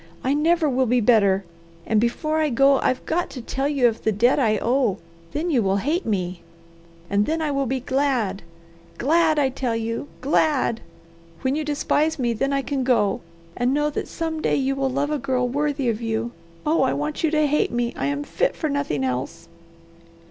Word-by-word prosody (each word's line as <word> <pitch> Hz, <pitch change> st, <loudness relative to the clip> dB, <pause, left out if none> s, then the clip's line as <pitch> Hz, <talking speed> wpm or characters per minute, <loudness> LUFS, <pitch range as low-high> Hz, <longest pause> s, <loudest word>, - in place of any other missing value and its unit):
I 265 Hz, -, +1 dB
never 320 Hz, +2 st, +2 dB
will 260 Hz, -2 st, +1 dB
be 245 Hz, +2 st, +3 dB
better. 200 Hz, -4 st, +3 dB, 0.4 s
And 215 Hz, -1 st, +2 dB
before 305 Hz, +7 st, 0 dB
I 310 Hz, -1 st, +2 dB
go 275 Hz, +2 st, +4 dB
I've 255 Hz, -, 0 dB
got 350 Hz, +2 st, -1 dB
to 260 Hz, -, -8 dB
tell 270 Hz, +3 st, -2 dB
you 275 Hz, -4 st, +3 dB
of 230 Hz, -1 st, -2 dB
the 220 Hz, -, +1 dB
debt 235 Hz, +7 st, +3 dB
I 220 Hz, -5 st, +2 dB
owe; 240 Hz, -3 st, +1 dB, 0.3 s
then 330 Hz, +4 st, -2 dB
you 255 Hz, -6 st, +3 dB
will 195 Hz, -1 st, +1 dB
hate 300 Hz, -, -1 dB
me, 180 Hz, -4 st, -2 dB, 0.7 s
and 200 Hz, +2 st, +1 dB
then 320 Hz, +1 st, 0 dB
I 310 Hz, -2 st, -1 dB
will 275 Hz, -1 st, 0 dB
be 260 Hz, +1 st, -1 dB
glad! 255 Hz, -7 st, 0 dB, 0.6 s
Glad, 315 Hz, +3 st, +3 dB
I 280 Hz, -2 st, +3 dB
tell 255 Hz, -3 st, -2 dB
you! 230 Hz, +4 st, -3 dB
Glad! 280 Hz, -4 st, +1 dB, 0.6 s
When 260 Hz, 0 st, +1 dB
you 310 Hz, +2 st, -1 dB
despise 300 Hz, +1 st, 0 dB
me? 240 Hz, -3 st, 0 dB
then 275 Hz, +5 st, -1 dB
I 275 Hz, 0 st, 0 dB
can 275 Hz, -1 st, -2 dB
go, 210 Hz, -6 st, +2 dB, 0.3 s
and 250 Hz, +3 st, +1 dB
know 295 Hz, 0 st, +1 dB
that -, -, -4 dB
some 320 Hz, -2 st, -3 dB
day -, -, +1 dB
you 270 Hz, 0 st, 0 dB
will 270 Hz, 0 st, 0 dB
love 280 Hz, +3 st, -1 dB
a 300 Hz, -, 0 dB
girl 250 Hz, -2 st, 0 dB
worthy 285 Hz, 0 st, -1 dB
of 230 Hz, -1 st, -1 dB
you. 225 Hz, +1 st, -2 dB, 0.3 s
Oh 310 Hz, 0 st, +2 dB
I 265 Hz, -, +2 dB
want 295 Hz, +3 st, -3 dB
you 320 Hz, -, +3 dB
to 305 Hz, 0 st, +2 dB
hate 295 Hz, +1 st, +1 dB
me 240 Hz, 0 st, -1 dB
I -, -, -2 dB
am 285 Hz, 0 st, -2 dB
fit -, -, -1 dB
for 310 Hz, -, -2 dB
nothing 280 Hz, -, -1 dB
else." 130 Hz, +6 st, -3 dB
265 Hz, 205 wpm, -23 LUFS, 230-295 Hz, 0.7 s, go